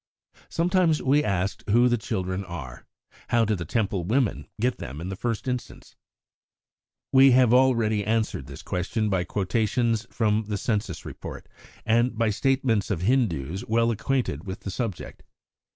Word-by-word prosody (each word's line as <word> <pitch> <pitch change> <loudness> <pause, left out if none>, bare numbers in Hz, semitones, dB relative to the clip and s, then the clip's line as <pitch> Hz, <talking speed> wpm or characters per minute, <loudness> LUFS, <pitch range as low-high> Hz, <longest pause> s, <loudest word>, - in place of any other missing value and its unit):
Sometimes 170 -2 +2
we 145 +3 +3
are - - -2
asked 100 -1 -1
who 120 +4 +5
the 120 - +3
children 95 -4 -3
are. 80 -9 -8 0.4
How 115 -1 +3
do 110 - +1
the 90 -4 -3
Temple 100 -1 -1
women 115 +5 0
get 125 +2 0
them 70 +4 -7
in 85 +3 -5
the 95 - -4
first 115 +4 -3
instance? 125 -1 -5 1.2
We 135 -1 +7
have 125 -2 +5
already 115 -5 +3
answered 110 - -1
this - - -10
question 105 +4 -1
by 90 -2 +1
quotations 110 +4 0
from 110 -1 +1
the 105 0 -3
Census 105 -4 -2
Report, - - -8 0.4
and 115 +1 +2
by 115 -1 +2
statements 115 -1 +1
of 90 -5 -1
Hindus 95 - 0
well 115 +1 +2
acquainted 115 - -2
with 95 - -6
the 100 - -5
subject. 105 -4 -5
110 Hz, 155 wpm, -25 LUFS, 95-120 Hz, 1.2 s, We